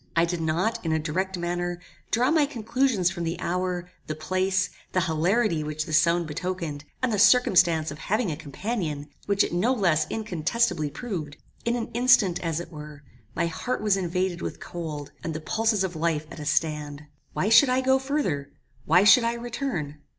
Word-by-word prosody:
I 165 0 +4
did 170 0 -3
not, 170 +8 0
in 165 - -1
a 160 - +2
direct 185 +5 -2
manner, 175 0 -2 0.3
draw 250 +5 +2
my 310 -3 +3
conclusions 230 - +1
from 175 -3 -5
the 165 +1 -3
hour, 180 0 -2 0.2
the 155 - -3
place, 185 +4 0 0.2
the 185 - +2
hilarity 170 +2 +1
which 155 0 -3
this 155 -2 +4
sound 170 +1 +2
betokened, 160 -2 -4 0.2
and 250 -3 +1
the 205 - 0
circumstance 175 - +4
of 145 - -9
having 215 -2 0
a - - -2
companion, 155 - -4 0.2
which 200 0 +3
it - - -3
no 195 +9 +2
less 175 -10 +2
incontestably 180 -4 0
proved. 155 - -5 0.3
In 235 +1 +1
an 235 -2 -4
instant, 240 -7 +4
as 165 -2 -2
it 175 0 -8
were, 150 -2 -10 0.3
my - - +1
heart 215 +9 -3
was 210 -2 +3
invaded 180 -1 -1
with - - -5
cold, 155 -4 -6
and 160 -2 -3
the - - -3
pulses 220 +4 +1
of 180 -2 -3
life 160 -1 0
at 170 - -9
a 150 - -6
stand. 150 -2 -1 0.3
"Why 205 - 0
should 255 +4 +7
I 255 +1 +2
go 265 0 +3
further? 265 - -2 0.4
Why 175 +5 +5
should 225 +4 +7
I 230 0 0
return? 235 - -4
175 Hz, 185 wpm, -26 LUFS, 155-220 Hz, 0.4 s, should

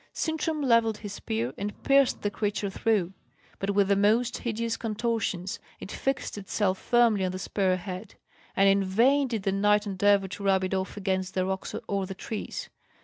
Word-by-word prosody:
Sintram 315 -1 -1
levelled 230 -4 +3
his 205 -2 -7
spear, 115 - -3
and 205 +1 -5
pierced 275 -2 +3
the 205 - 0
creature 205 -1 -2
through. 195 -4 0 0.5
But, 195 - -2
with 200 -1 +4
the 200 - +3
most 220 +5 +2
hideous 230 -1 -2
contortions, 215 -5 -2 0.2
it - - -8
fixed 265 -5 -2
itself 195 -1 -1
firmly 235 -5 +3
on 185 - 0
the - - -3
spear 185 -1 0
head; 185 +2 -7 0.4
and 195 - +5
in 195 0 +4
vain 250 +9 +3
did 225 -5 -3
the 195 - +1
knight 210 +2 +3
endeavour 200 0 +2
to 195 +2 -8
rub 190 -1 +3
it 185 - -2
off 190 +1 -2
against 190 -1 -2
the 185 -1 +1
rocks 190 0 -3
or 195 -1 -1
the 190 - -6
trees. 215 +2 -5
205 Hz, 185 wpm, -27 LUFS, 190-225 Hz, 0.5 s, and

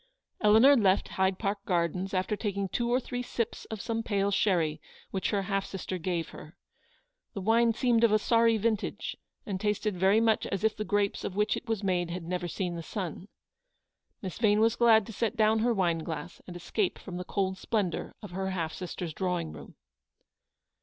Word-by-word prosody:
Eleanor 220 +7 +7
left 200 -5 +3
Hyde 190 0 +1
Park 200 -1 -2
Gardens 180 +1 0
after 185 +2 0
taking 200 -2 -2
two 235 +5 -1
or 250 - +4
three 245 -1 -4
sips 235 -2 -3
of 220 - -6
some 225 -1 -2
pale 200 -3 0
sherry 170 -7 +1 0.3
which 190 - -1
her 200 -1 0
half 195 0 -1
sister 190 -1 -5
gave 170 -1 -2
her. 155 - -12 0.8
The 200 - -3
wine 230 +3 +4
seemed 235 -1 +2
of 230 - +5
a 215 - +5
sorry 230 +1 +3
vintage, 220 -1 -1 0.3
and 195 -2 -4
tasted 210 -1 0
very 190 +4 +4
much 225 -1 +2
as 195 +1 -3
if 220 -1 +2
the 215 - -3
grapes 205 -1 0
of 185 - -4
which 210 +1 +2
it - - -7
was 220 -2 -1
made 180 -3 0
had 175 0 -4
never 175 +1 -3
seen 175 0 -3
the 170 - -4
sun. 180 +2 -5 1.0
Miss 185 +2 -5
Vane 210 -2 +4
was 225 0 +3
glad 225 -3 +5
to 225 - -9
set 225 +2 -1
down 220 0 +4
her 240 +2 +2
wine 175 -6 +1
glass 160 0 -6
and 180 - -8
escape 180 +3 -1
from 180 -2 -8
the 180 - -4
cold 190 0 -2
splendour 205 -6 -2
of 205 - -8
her 190 +1 -2
half 165 -4 -2
sister's 180 -2 -5
drawing 180 -3 -2
room. - - -11
200 Hz, 195 wpm, -29 LUFS, 180-220 Hz, 1.0 s, Eleanor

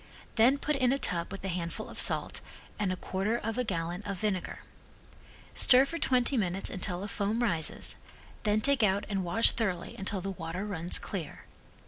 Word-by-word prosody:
Then 245 +5 +5
put 300 +1 -1
in 255 -2 +3
a 275 - +2
tub 170 -9 -2
with 195 - -7
a - - 0
handful 170 -2 -3
of - - -8
salt - - +2 0.4
and 200 -3 +1
a - - 0
quarter 195 +5 -1
of 225 +1 -3
a - - +2
gallon 175 -3 -2
of 200 -2 -4
vinegar. 195 -3 -2 0.9
Stir 260 +1 +7
for 330 +4 -5
twenty 255 -1 +2
minutes 190 -2 -1
until 185 -1 -2
a - - -3
foam 210 +3 -1
rises, 165 -8 -1 0.4
then 215 0 +2
take 275 +1 +3
out 200 -1 +2
and 195 -2 -1
wash 175 +6 +4
thoroughly 190 -7 -2
until 195 0 -3
the 195 +2 -3
water 180 +1 -5
runs 180 -4 -1
clear. 185 -7 -6
200 Hz, 185 wpm, -30 LUFS, 180-230 Hz, 0.9 s, Stir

